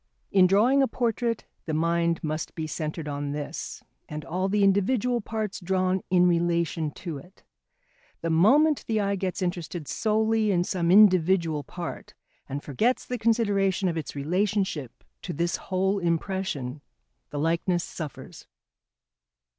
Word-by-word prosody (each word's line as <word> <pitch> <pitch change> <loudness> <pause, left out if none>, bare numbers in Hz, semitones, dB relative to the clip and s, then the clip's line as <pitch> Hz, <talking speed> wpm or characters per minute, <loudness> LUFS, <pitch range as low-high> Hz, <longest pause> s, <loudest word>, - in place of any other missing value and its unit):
In 185 -2 +6
drawing 230 +9 +4
a 270 - +3
portrait 235 -2 -1 0.2
the 155 - -1
mind 170 +1 +1
must 155 0 -3
be 160 - -3
centred 155 0 -4
on 145 0 -3
this, 145 +1 -6 0.3
and 150 0 -6
all 185 +3 -1
the 205 +1 +2
individual 225 +5 +2
parts 215 -1 -4
drawn 185 0 0
in 180 -1 +4
relation 170 -2 +1 0.2
to 160 -5 -4
it. 180 +8 -18 0.8
The 165 - -1
moment 280 - +4
the 220 -1 +1
eye 200 -1 +1
gets 190 0 -2
interested 175 -3 -4
solely 220 0 +1
in 175 -3 +2
some 175 -2 -1
individual 180 -5 +5
part 175 +2 -7 0.3
and 140 +2 -4
forgets 220 - 0
the 250 -1 -4
consideration 205 -4 +2
of 170 - -1
its 155 -4 -5
relationship 180 - -1 0.2
to - - -5
this 170 +3 -1
whole 190 +1 0
impression, 165 -6 -2 0.5
the 145 - -6
likeness 170 +3 +1
suffers. 155 -4 -8
180 Hz, 140 wpm, -26 LUFS, 160-205 Hz, 0.8 s, In